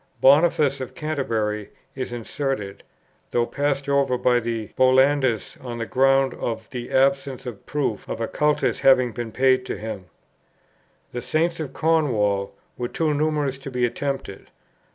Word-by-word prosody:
Boniface 140 Hz, -1 st, +4 dB
of 130 Hz, -, -7 dB
Canterbury 110 Hz, -9 st, -2 dB, 0.2 s
is 130 Hz, -2 st, -5 dB
inserted, 120 Hz, -3 st, -4 dB, 0.5 s
though 120 Hz, -1 st, +1 dB
passed 140 Hz, +1 st, -1 dB
over 140 Hz, -2 st, +2 dB
by 125 Hz, 0 st, +3 dB
the 115 Hz, -2 st, -3 dB
Bollandists 130 Hz, -2 st, +2 dB
on 120 Hz, -2 st, -5 dB
the 115 Hz, -, -3 dB
ground 135 Hz, +1 st, +3 dB
of 115 Hz, -1 st, -4 dB
the 120 Hz, -1 st, -5 dB
absence 135 Hz, 0 st, +1 dB
of 120 Hz, -5 st, -8 dB
proof 140 Hz, -8 st, -2 dB
of -, -, -4 dB
a 115 Hz, -, -1 dB
cultus 150 Hz, 0 st, +1 dB
having 130 Hz, -2 st, +5 dB
been 115 Hz, +1 st, -5 dB
paid 130 Hz, +1 st, +3 dB
to -, -, -3 dB
him. 105 Hz, -4 st, -6 dB, 1.1 s
The 120 Hz, -, -4 dB
Saints 165 Hz, +4 st, 0 dB
of 145 Hz, -4 st, -5 dB
Cornwall 110 Hz, -12 st, +1 dB, 0.2 s
were 120 Hz, -, -1 dB
too 155 Hz, +5 st, 0 dB
numerous 145 Hz, -3 st, 0 dB
to 135 Hz, -, -7 dB
be 125 Hz, -2 st, +1 dB
attempted. 135 Hz, -5 st, -4 dB
130 Hz, 150 wpm, -23 LUFS, 115-140 Hz, 1.1 s, having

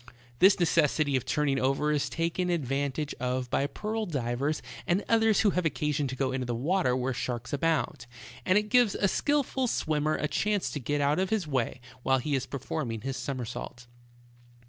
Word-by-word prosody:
This 190 Hz, +1 st, +6 dB
necessity 155 Hz, -4 st, +2 dB
of 130 Hz, -1 st, 0 dB
turning 140 Hz, -1 st, +1 dB
over 135 Hz, +3 st, +1 dB
is 150 Hz, -2 st, 0 dB
taken 170 Hz, +2 st, -1 dB
advantage 140 Hz, -2 st, -1 dB
of 125 Hz, 0 st, -2 dB
by 140 Hz, -, +1 dB
pearl 215 Hz, +8 st, -3 dB
divers 140 Hz, 0 st, -1 dB, 0.2 s
and 180 Hz, +4 st, +1 dB
others 225 Hz, -2 st, +4 dB
who 210 Hz, -, +4 dB
have 180 Hz, -, 0 dB
occasion 150 Hz, -2 st, 0 dB
to 130 Hz, -, -4 dB
go 130 Hz, 0 st, 0 dB
into 130 Hz, -1 st, -2 dB
the 120 Hz, -, -1 dB
water 145 Hz, +1 st, +1 dB
where 130 Hz, +1 st, -1 dB
sharks 120 Hz, 0 st, -4 dB
abound, 155 Hz, -4 st, 0 dB, 0.4 s
and 185 Hz, +2 st, +3 dB
it 210 Hz, 0 st, 0 dB
gives 245 Hz, -4 st, +4 dB
a 200 Hz, -, +2 dB
skillful 275 Hz, +2 st, +1 dB
swimmer 155 Hz, -6 st, 0 dB
a 150 Hz, -, -1 dB
chance 205 Hz, +4 st, 0 dB
to 145 Hz, -, -3 dB
get 145 Hz, +3 st, -1 dB
out 145 Hz, +4 st, +2 dB
of 190 Hz, 0 st, 0 dB
his 220 Hz, -5 st, 0 dB
way 130 Hz, -3 st, -1 dB, 0.2 s
while 130 Hz, +1 st, +3 dB
he 145 Hz, +3 st, -2 dB
is 135 Hz, -3 st, 0 dB
performing 135 Hz, -4 st, -4 dB
his 135 Hz, +3 st, -3 dB
somersault. 125 Hz, -2 st, -5 dB
145 Hz, 185 wpm, -29 LUFS, 130-180 Hz, 0.4 s, This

